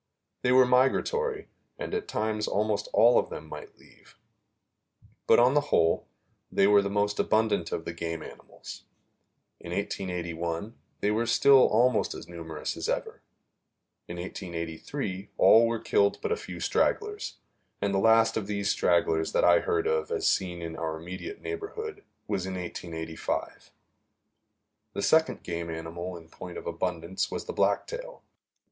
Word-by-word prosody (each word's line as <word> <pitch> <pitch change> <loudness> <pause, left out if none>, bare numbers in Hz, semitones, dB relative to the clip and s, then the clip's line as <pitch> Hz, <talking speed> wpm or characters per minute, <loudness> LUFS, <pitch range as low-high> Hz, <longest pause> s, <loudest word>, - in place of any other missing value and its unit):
They 125 - +2
were 130 0 +7
migratory, 415 - +1 0.3
and - - -5
at 435 -1 -2
times 110 0 -1
almost 105 0 0
all 120 +2 +6
of - - -2
them 80 - -8
might 75 -1 -10
leave; - - -21 1.1
but, - - +7
on 125 +2 +5
the 145 0 +2
whole, 80 0 +2 0.4
they 100 - +3
were 100 0 +6
the 100 - -2
most 105 0 0
abundant 105 -6 +1
of 80 - -3
the 85 - -4
game 85 -1 -4
animals. - - -11 0.7
In 85 - -9
1881 90 0 -3 0.3
they 105 - +2
were 115 +2 0
still 135 +3 +6
almost 120 +1 +2
as - - -9
numerous 80 -3 -5
as - - -4
ever. - - -3 0.9
In 85 - -7
1883 90 - -5
all 115 +1 +7
were 115 0 -1
killed 100 -2 +2
but 445 - -3
a - - +3
few - - -8
stragglers, 425 -1 0 0.4
and 100 -1 0
the 95 - +2
last 115 +2 +4
of 105 -3 -3
these 100 -1 0
stragglers 80 -2 +1
that - - +2
I - - +6
heard 430 -2 0
of 465 +1 0
as 450 -4 -2
seen 90 -3 0
in 80 -1 -5
our 80 -1 -3
immediate 90 - -7
neighborhood 420 0 -5 0.2
was 95 -3 -2
in 95 - -4
1885. 80 -2 -5 1.2
The 100 - -3
second 160 0 +3
game 85 -1 -4
animal 85 +2 -5
in 80 -1 -14
point 90 +2 -9
of - - -8
abundance 85 +1 -2
was - - -5
the - - -5
blacktail. - - -1
100 Hz, 155 wpm, -28 LUFS, 85-125 Hz, 1.2 s, were